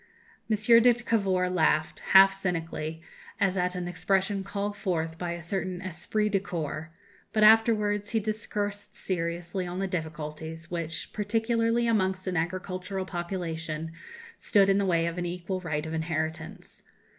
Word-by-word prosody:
M. 220 - +3 0.3
de 245 +1 +6
Cavour 195 -6 +1
laughed, 160 -3 +1
half 195 0 +7
cynically, 165 -4 -3 0.4
as 195 -2 +2
at 180 0 0
an 180 -1 -3
expression 195 +3 0
called 200 +1 -3
forth 165 -4 -2
by 175 -1 -2
a 170 -1 -7
certain 185 +1 -2
esprit 190 +4 -1
de 195 -1 +2
corps; 160 -4 -4 0.4
but 215 - +2
afterwards 210 -2 +5
he 225 - +1
discoursed 205 -1 -3
seriously 175 +1 -3
on 175 +1 -5
the 195 - 0
difficulties 160 -1 -5
which, 165 -2 -3
particularly 230 +2 +1
amongst 190 -4 +1
an 185 -1 -2
agricultural 185 +3 -2
population, 165 -3 -4 0.5
stood 195 -1 +4
in 195 0 +4
the 200 - +1
way 170 -2 +2
of 170 +1 -2
an 175 - -2
equal 180 +2 -4
right 155 -3 -2
of 160 - -5
inheritance. 160 0 -4
185 Hz, 145 wpm, -28 LUFS, 165-200 Hz, 0.5 s, half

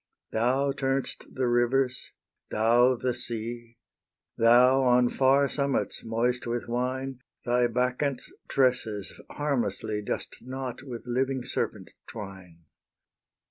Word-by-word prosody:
Thou 130 +5 +1
turn'st 135 -1 -2
the 130 - -1
rivers, 125 +2 +1 0.4
thou 120 +4 +4
the 125 +1 -1
sea; 120 0 -2 0.6
Thou, 125 +3 +5
on 125 -1 +4
far 135 +1 +3
summits, 140 0 -1
moist 120 +2 -1
with 120 0 -2
wine, 130 +2 -2 0.3
Thy 120 0 +3
Bacchants' 125 +3 -1
tresses 115 -6 0 0.2
harmlessly 120 -7 -2
Dost 105 - -4
knot 130 0 -6
with 125 -4 -8
living 130 +1 -1
serpent - - -3 0.2
twine. 95 -6 -10
125 Hz, 105 wpm, -27 LUFS, 115-130 Hz, 0.6 s, Thou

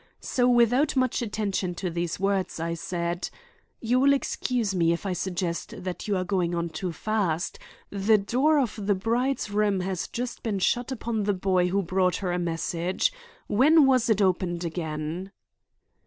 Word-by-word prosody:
So, 250 -1 +1
without 245 +5 +3
much 255 -1 +1
attention 205 -5 -2
to 180 0 -3
these 170 0 -3
words, 195 -3 0
I 165 +1 -2
said: 170 +1 -3 0.5
"You 245 +2 +2
will 280 +1 +5
excuse 250 -5 -1
me 170 -2 +3
if 170 - -5
I 190 - 0
suggest 180 -2 -3
that 185 +2 -5
you 205 -2 +1
are 185 - 0
going 180 -2 0
on 170 0 -1
too 170 +3 -4
fast. 185 -2 -1 0.3
The 205 +2 +3
door 255 +10 +2
of 220 -7 -1
the 205 - +3
bride's 235 +4 -1
room 205 -2 +1
has 185 -1 -3
just 240 0 -5
been 215 -4 -1
shut 240 +7 0
upon 225 -4 -2
the 205 -1 +1
boy 185 -1 +2
who 195 +2 0
brought 185 +1 +1
her 185 -3 -2
a 175 - 0
message. 170 - -1 0.3
When 290 +8 +5
was 255 -3 +3
it 210 -2 +3
opened 180 -2 0
again?" 160 +2 -4
195 Hz, 170 wpm, -26 LUFS, 175-230 Hz, 0.5 s, will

